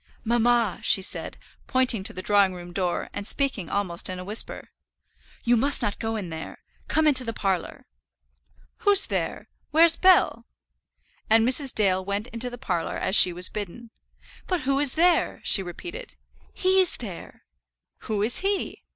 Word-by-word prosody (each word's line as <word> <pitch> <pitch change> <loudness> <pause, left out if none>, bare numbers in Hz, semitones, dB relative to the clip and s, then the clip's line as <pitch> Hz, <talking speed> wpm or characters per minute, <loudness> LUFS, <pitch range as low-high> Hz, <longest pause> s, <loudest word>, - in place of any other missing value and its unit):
"Mamma," 235 -2 +1
she 190 - +4
said, - - 0 0.3
pointing 255 -6 +1
to - - -3
the 185 - -8
drawing 200 -3 +2
room 175 0 -11
door, 180 -2 -3
and 205 0 -5
speaking 265 - -2
almost 185 -4 -1
in 185 - -5
a 180 - -7
whisper, 210 +4 -2 0.7
"you 240 0 +3
must 275 +5 +1
not 205 - -3
go 225 0 -3
in 190 -6 -6
there; 160 0 -9 0.2
come 315 - +1
into 270 -4 +5
the 230 -2 -5
parlour." 190 -5 -3 0.9
"Who's 405 -3 +4
there? - - -4 0.2
Where's 330 +2 +5
Bell?" 355 -10 +3 0.8
and 225 +1 +4
Mrs. 260 +1 +1
Dale 190 -3 +1
went 200 +2 -3
into 235 +1 -3
the 245 - -9
parlour 180 -10 -3
as 190 - 0
she 180 - +8
was 175 0 -1
bidden. 215 +3 -8 0.6
"But 365 -3 -1
who 275 +1 0
is 285 -2 +3
there?" 340 +1 +2
she 195 - +3
repeated. 350 - -8 0.4
"He's 375 -1 +2
there!" 195 -8 -10 0.6
"Who 210 -2 -2
is 230 +3 +2
he?" 395 0 -3
225 Hz, 160 wpm, -24 LUFS, 190-275 Hz, 0.9 s, she